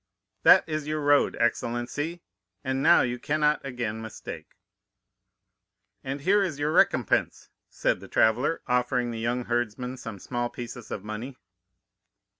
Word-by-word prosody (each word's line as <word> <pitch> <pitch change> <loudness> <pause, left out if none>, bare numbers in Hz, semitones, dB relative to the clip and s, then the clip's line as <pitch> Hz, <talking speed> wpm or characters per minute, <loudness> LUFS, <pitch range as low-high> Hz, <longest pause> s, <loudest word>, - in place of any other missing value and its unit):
"'That - - +7
is 155 -2 -3
your 155 0 -1
road, 145 -1 +3
excellency, 120 +8 -1 0.4
and 130 -1 -1
now 165 +4 +6
you 125 -1 -1
cannot 150 +1 +1
again 120 -4 -4
mistake.' 110 -1 -9 1.5
"'And 135 +1 -4
here 200 +6 +3
is 175 -8 -1
your 145 +1 0
recompense,' - - +2 0.2
said - - 0
the - - -11
traveller, 125 +9 +2
offering 125 -1 0
the 115 - -5
young 120 +2 -1
herdsman 120 +2 -2
some 115 -4 -7
small 120 +5 -3
pieces 120 -1 -8
of 100 - -5
money. 110 +5 -6
125 Hz, 135 wpm, -27 LUFS, 120-145 Hz, 1.5 s, That